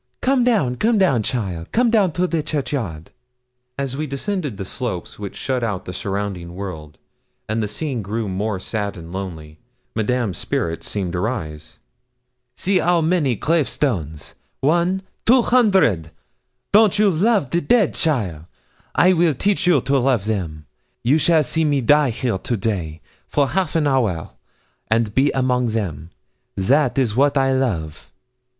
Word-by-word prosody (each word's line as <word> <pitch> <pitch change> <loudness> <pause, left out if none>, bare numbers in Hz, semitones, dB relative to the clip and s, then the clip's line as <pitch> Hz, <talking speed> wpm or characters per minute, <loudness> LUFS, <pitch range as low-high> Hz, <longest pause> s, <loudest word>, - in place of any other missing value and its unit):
'Come 260 -1 +2
down, 180 - +1
come 225 - +2
down, 175 - +3
cheaile 100 -9 -3
come 240 0 +2
down 205 -6 +3
to 180 +2 +1
the 165 -3 -1
churchyard.' 130 - -3 0.7
As 135 -2 -3
we 155 +2 -3
descended 145 - -3
the 95 - -5
slope 95 -5 -3
which 100 -2 -6
shut 130 -2 -2
out 105 -5 -2
the 90 - -6
surrounding 95 -4 -4
world, 80 -6 -7 0.5
and 110 +1 -1
the 105 - -1
scene 130 +3 -3
grew 105 +2 -3
more 100 +1 -2
sad 100 0 -3
and 85 0 -10
lonely, 85 -5 -7 0.4
Madame's 110 -4 -1
spirits 80 -1 -2
seemed 95 -4 -2
to 90 - -1
rise. 80 -8 -4 0.8
'See 190 0 +1
'ow 175 0 +2
many 160 -6 +1
grave 155 +5 +1
stones 80 - -2 0.3
one, 175 +6 +1 0.2
two 245 +1 +6
hundred. 190 - +3 0.6
Don't 210 -1 +5
you 205 -1 +4
love 190 - +1
the 170 - +1
dead, 230 -5 +3
cheaile? 95 - -1 0.5
I 185 +1 +5
will 165 -4 +2
teach 190 +4 0
you 160 -7 +4
to 135 +2 +1
love 125 -5 +1
them. 85 -8 -3 0.4
You 140 +7 +3
shall 160 0 +4
see 160 +4 0
me 145 -2 +2
die 145 +3 +4
here 115 -3 -2
to 120 - -2
day, 90 -7 -3 0.3
for 140 -2 +1
half 185 +7 -1
an 160 -2 +2
hour, 115 - 0 0.6
and 110 -1 +1
be 135 +4 +3
among 125 -2 +1
them. 90 -9 -3 0.5
That 130 +8 +2
is 120 -6 +1
what 140 +2 +3
I 135 0 +3
love.' 95 - -2
125 Hz, 160 wpm, -21 LUFS, 95-160 Hz, 0.8 s, two